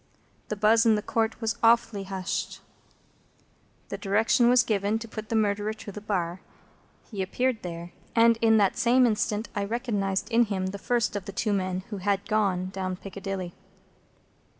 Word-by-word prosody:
The 215 Hz, -, -3 dB
buzz 215 Hz, +2 st, +4 dB
in 225 Hz, -2 st, +4 dB
the 210 Hz, -, -2 dB
Court 225 Hz, 0 st, -1 dB
was 225 Hz, -1 st, -2 dB
awfully 230 Hz, -3 st, +3 dB
hushed. 190 Hz, -1 st, -4 dB, 1.3 s
The -, -, -5 dB
direction 220 Hz, +4 st, +3 dB
was 250 Hz, -1 st, +5 dB
given 210 Hz, -1 st, 0 dB
to 230 Hz, 0 st, -7 dB
put 215 Hz, -1 st, -8 dB
the 230 Hz, -, -1 dB
Murderer 210 Hz, 0 st, +1 dB
to 215 Hz, -1 st, -9 dB
the 210 Hz, -, -8 dB
bar. 185 Hz, -4 st, -2 dB, 0.7 s
He 200 Hz, -3 st, -3 dB
appeared 240 Hz, +5 st, -1 dB
there. 170 Hz, 0 st, -7 dB, 0.2 s
And 230 Hz, 0 st, +5 dB
in 225 Hz, -1 st, +5 dB
that 200 Hz, -3 st, +2 dB
same 250 Hz, +1 st, +4 dB
instant 215 Hz, -1 st, 0 dB
I 205 Hz, -, 0 dB
recognised 205 Hz, -3 st, -2 dB
in 235 Hz, +1 st, +4 dB
him 195 Hz, -3 st, -2 dB
the 200 Hz, -, -6 dB
first 235 Hz, -1 st, 0 dB
of 200 Hz, -2 st, -4 dB
the -, -, -6 dB
two 210 Hz, +2 st, -1 dB
men 185 Hz, -1 st, -1 dB
who 205 Hz, -, -3 dB
had 200 Hz, +1 st, -1 dB
gone 190 Hz, -4 st, 0 dB
down 185 Hz, -1 st, -3 dB
Piccadilly. 195 Hz, -2 st, -6 dB
210 Hz, 175 wpm, -27 LUFS, 195-225 Hz, 1.3 s, was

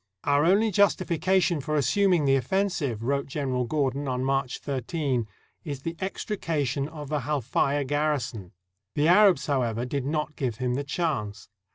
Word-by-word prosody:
"Our 145 Hz, +1 st, +3 dB
only 205 Hz, +5 st, +4 dB
justification 185 Hz, -3 st, +2 dB
for 155 Hz, +3 st, -2 dB
assuming 170 Hz, +4 st, +3 dB
the 135 Hz, 0 st, +4 dB
offensive," 140 Hz, -, -1 dB
wrote 140 Hz, +3 st, 0 dB
General 130 Hz, -3 st, -1 dB
Gordon 140 Hz, +1 st, -1 dB
on 130 Hz, -1 st, -1 dB
March 135 Hz, -1 st, 0 dB
13, 135 Hz, -3 st, -2 dB, 0.4 s
"is 140 Hz, -5 st, -6 dB
the 165 Hz, 0 st, -3 dB
extrication 155 Hz, -, -2 dB
of 150 Hz, -3 st, -8 dB
the 150 Hz, -1 st, 0 dB
Halfaya 140 Hz, 0 st, 0 dB
garrison." 135 Hz, -9 st, -2 dB, 0.4 s
The 150 Hz, +1 st, +2 dB
Arabs, 180 Hz, -4 st, +5 dB
however, 120 Hz, -4 st, 0 dB
did 135 Hz, +1 st, -3 dB
not 150 Hz, 0 st, -2 dB
give 125 Hz, -5 st, -2 dB
him 125 Hz, +1 st, -1 dB
the 140 Hz, +3 st, -1 dB
chance. 135 Hz, -, -3 dB
145 Hz, 150 wpm, -26 LUFS, 130-165 Hz, 0.4 s, Arabs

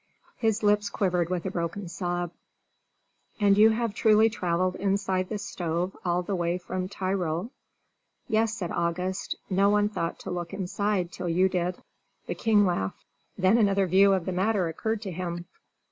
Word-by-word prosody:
His 220 Hz, -1 st, 0 dB
lips 205 Hz, 0 st, +3 dB
quivered 180 Hz, -5 st, 0 dB
with 180 Hz, -2 st, -2 dB
a 190 Hz, -, -2 dB
broken 175 Hz, +2 st, -3 dB
sob. 175 Hz, 0 st, -3 dB, 1.1 s
"And 200 Hz, -1 st, +5 dB
have -, -, +1 dB, 0.3 s
you -, -, -22 dB
truly 220 Hz, +1 st, +4 dB
travelled 180 Hz, -2 st, 0 dB
inside 195 Hz, -1 st, 0 dB
this 210 Hz, -1 st, -4 dB
stove 175 Hz, +2 st, -2 dB
all 175 Hz, 0 st, 0 dB
the 200 Hz, -, -3 dB
way 175 Hz, -1 st, 0 dB
from 185 Hz, 0 st, -4 dB
Tyrol?" 185 Hz, 0 st, -2 dB, 0.8 s
"Yes," 220 Hz, 0 st, +2 dB
said 180 Hz, -6 st, -4 dB
August; 180 Hz, +3 st, -2 dB
"no 195 Hz, +1 st, +3 dB
one 205 Hz, 0 st, +3 dB
thought 170 Hz, -5 st, -3 dB
to -, -, -6 dB
look 175 Hz, -1 st, -4 dB
inside 195 Hz, -1 st, -1 dB
till 180 Hz, -1 st, -4 dB
you 180 Hz, +3 st, +3 dB
did." 180 Hz, -1 st, -1 dB, 0.5 s
The -, -, -3 dB
king 210 Hz, -2 st, +3 dB
laughed; 95 Hz, -, -2 dB, 0.3 s
then 190 Hz, +5 st, +4 dB
another 200 Hz, -2 st, +3 dB
view 195 Hz, +2 st, +5 dB
of 185 Hz, -3 st, 0 dB
the 185 Hz, -, -2 dB
matter 190 Hz, 0 st, +1 dB
occurred 220 Hz, +7 st, -2 dB
to 195 Hz, -, -4 dB
him. 175 Hz, 0 st, -4 dB
185 Hz, 165 wpm, -27 LUFS, 175-205 Hz, 1.1 s, And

